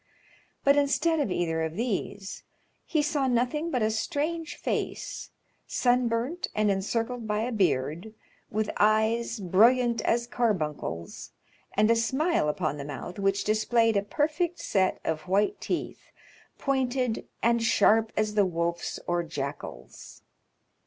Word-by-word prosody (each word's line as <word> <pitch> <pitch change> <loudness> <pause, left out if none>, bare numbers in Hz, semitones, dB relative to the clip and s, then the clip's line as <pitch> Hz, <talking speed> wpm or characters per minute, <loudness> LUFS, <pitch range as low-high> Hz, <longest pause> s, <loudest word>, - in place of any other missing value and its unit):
But 280 +1 +5
instead 310 +3 +2
of 285 - 0
either 165 -3 0
of 160 0 -2
these, 205 -3 -3 0.5
he 310 -3 +1
saw 290 -2 0
nothing 255 +7 0
but 250 -8 0
a 215 - +2
strange 320 +7 -2
face, - - -3 0.4
sunburnt, 245 +5 +1
and 215 -1 +3
encircled 225 +4 -2
by 210 0 0
a 240 +3 -2
beard, 180 - 0 0.3
with 215 0 -1
eyes 220 +2 +2
brilliant 230 +5 +4
as 235 +2 +1
carbuncles, 155 - -2 0.4
and 215 +2 +5
a - - +5
smile 265 - +1
upon 150 -2 -1
the 140 - -5
mouth 145 +6 -7
which 195 0 +1
displayed 225 +1 +2
a 200 - +3
perfect 315 - -1
set 190 - +1
of 155 +1 -2
white 205 - +1
teeth, - - -4 0.5
pointed 255 -3 -1 0.2
and 235 0 +3
sharp 225 0 +4
as 215 0 +1
the 210 -1 +4
wolf's 170 0 -2
or 175 0 +1
jackal's. 140 - -7
220 Hz, 130 wpm, -27 LUFS, 190-250 Hz, 0.5 s, But